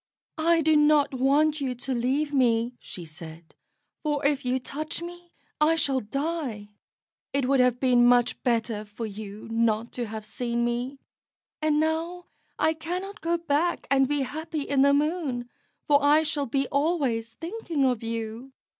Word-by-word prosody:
"I 330 +1 +4
do 315 0 +3
not 295 -1 +4
want 290 +4 +2
you 260 -2 -1
to 260 +2 -3
leave 270 +5 0
me," 240 -2 +2
she 175 - -8
said, 160 +1 -11 0.5
"for 295 -2 -1
if 285 -1 +2
you 250 +1 +1
touch 295 +4 -4
me 345 0 -9 0.3
I 310 +2 +4
shall 275 -4 +2
die. 270 -3 -3 0.6
It 275 -2 +1
would 275 0 +3
have 250 -1 +3
been 245 -2 +4
much 245 0 +3
better 225 -3 0
for 215 +2 -7
you 210 0 -8
not 225 0 +1
to 240 -2 -3
have 215 0 -6
seen 235 +2 -2
me; 245 +3 -2 0.6
and 305 -1 +2
now 330 +3 -1 0.3
I 315 - +2
cannot 360 +6 -5
go 335 +1 +1
back 335 +1 0
and 270 -1 +4
be 290 0 0
happy 315 +3 -4
in 280 -1 +1
the 280 +1 +6
Moon, 285 -4 0 0.4
for 285 -1 +4
I 300 +2 +5
shall 295 -2 -1
be 270 +3 0
always 275 -7 0
thinking 335 - -2
of 250 -4 +1
you." 230 +3 -5
275 Hz, 165 wpm, -26 LUFS, 235-310 Hz, 0.6 s, the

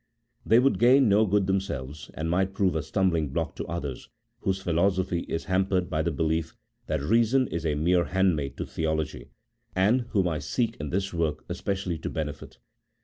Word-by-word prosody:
They 115 - +4
would 135 +3 +3
gain 125 +1 +6
no 105 +2 +4
good 100 0 +2
themselves, 80 -7 -3
and 80 - -3
might 95 +3 0
prove 95 -4 +2
a 80 - 0
stumbling 85 -2 0
block 70 - -2
to - - -4
others, 75 -7 -5 0.3
whose 95 0 -1
philosophy 90 0 +1
is 80 - -2
hampered 95 -1 0
by 80 - +1
the 85 - 0
belief 80 +1 -1 0.3
that - - -1
Eeason 115 - +3
is 85 -1 -2
a 75 - +1
mere 85 +3 +2
handmaid 85 -6 0
to - - -3
Theology, 80 -2 -3 0.5
and 115 +6 +2
whom 95 -5 +2
I 80 -3 -1
seek 115 - -1
in 75 -1 -5
this 95 +3 -2
work 80 -3 -1
especially 95 -4 -2
to - - -4
benefit. 75 -3 -5
90 Hz, 180 wpm, -27 LUFS, 80-100 Hz, 0.5 s, gain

